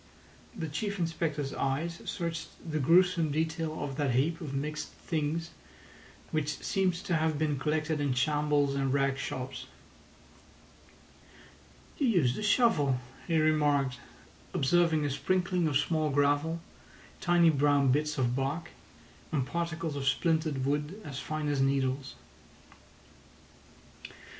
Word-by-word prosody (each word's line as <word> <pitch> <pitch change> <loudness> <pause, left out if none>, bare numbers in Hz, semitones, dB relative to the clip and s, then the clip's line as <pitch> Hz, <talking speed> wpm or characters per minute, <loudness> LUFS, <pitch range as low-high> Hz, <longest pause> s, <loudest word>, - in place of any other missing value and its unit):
The 165 -6 -3
Chief 200 +7 -3
Inspector's 160 -4 -2
eyes 155 +5 -2
searched 165 -1 -3 0.2
the 155 -1 -1
gruesome 170 +2 +4
detail 160 +1 -2
of 140 -1 -5
that 140 -5 +1
heap 160 +6 +1
of 150 -5 -5
mixed 150 +2 -3
things, 160 +1 -3 0.8
which 150 -2 -1
seemed 190 -2 +1
to 175 0 -2
have 160 -1 +1
been 150 -2 0
collected 155 +1 0
in 140 -3 0
shambles 145 +1 +2
and 135 -1 0
rag 135 0 +1
shops. 130 -1 -5 2.3
"You 280 - +2
used 155 - +3
a - - -4
shovel," 205 - +3 0.3
he 165 -2 +2
remarked, 145 -4 +2 0.6
observing 160 +1 +3
a - - 0
sprinkling 180 +3 +1
of 145 -3 +2
small 155 +1 +1
gravel, 145 +4 +1 0.6
tiny 175 -2 +4
brown 145 -2 +3
bits 150 +2 0
of 125 -2 +1
bark, 145 +5 -2 0.6
and 135 -5 0
particles 165 0 -3
of 135 -1 -3
splintered 155 -2 +1
wood 150 +7 -1
as 140 -2 -5
fine 155 -1 -3
as 145 -2 +1
needles. 135 0 0
150 Hz, 125 wpm, -30 LUFS, 140-165 Hz, 2.3 s, gruesome